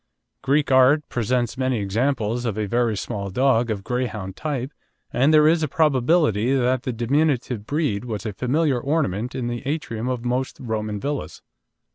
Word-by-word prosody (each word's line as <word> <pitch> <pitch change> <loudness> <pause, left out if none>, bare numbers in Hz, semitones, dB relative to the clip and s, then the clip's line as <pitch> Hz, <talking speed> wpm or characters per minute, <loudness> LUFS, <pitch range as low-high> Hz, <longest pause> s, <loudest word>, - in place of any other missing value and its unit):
Greek 140 +1 +1
art 130 +4 +5
presents 120 +1 -1
many 130 -1 +1
examples 115 +3 -1
of 110 -4 -2
a 105 - 0
very 115 0 0
small 100 -1 -4
dog 120 +2 +2
of 105 -3 -3
Greyhound 110 -6 -3
type, 140 -2 -3 0.4
and 135 +5 +3
there 155 -1 +6
is 160 +1 +3
a 155 - +1
probability 135 - +2
that 130 -1 +1
the 130 - -3
diminutive 125 -2 0
breed 145 -8 -1
was 110 -2 -5
a 105 - -3
familiar 130 +4 +1
ornament 125 - -1
in 125 - -3
the 120 0 -3
atrium 125 -6 -3
of 125 -2 -3
most 125 +2 -1
Roman 110 -3 -3
villas. 145 +4 -4
125 Hz, 165 wpm, -23 LUFS, 110-140 Hz, 0.4 s, there